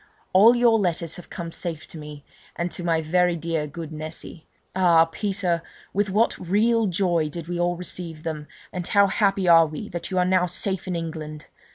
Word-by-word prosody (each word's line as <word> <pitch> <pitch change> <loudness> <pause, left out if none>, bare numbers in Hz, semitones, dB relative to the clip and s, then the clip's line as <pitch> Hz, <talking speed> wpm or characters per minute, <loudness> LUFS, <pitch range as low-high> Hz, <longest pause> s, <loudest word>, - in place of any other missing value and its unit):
All 215 +6 +7
your 235 -2 +4
letters 170 -3 -1
have 180 - -12
come 170 -2 -6
safe 165 -2 -5
to - - -9
me, 150 -1 -10 0.3
and 170 0 -2
to 175 - -6
my 165 -2 +1
very 175 +2 +2
dear 165 -2 -2
good 160 +2 -7
Nessy. 155 +1 -7 0.3
Ah! 170 -3 +5
Peter, 185 -1 -1 0.3
with 205 +1 +1
what 215 +4 +2
real 220 +5 +2
joy 175 -4 +1
did 165 +1 -7
we 175 0 -3
all 175 0 +1
receive 170 -3 -7
them, 155 -2 -4 0.3
and 180 -1 -4
how 200 -1 +5
happy 195 -1 +1
are 165 -1 +7
we 155 -1 -7
that 175 0 -6
you 185 - -2
are 180 - +3
now 185 -1 +3
safe 190 +2 -3
in 180 - -2
England! 155 -2 -5
175 Hz, 195 wpm, -24 LUFS, 160-190 Hz, 0.3 s, All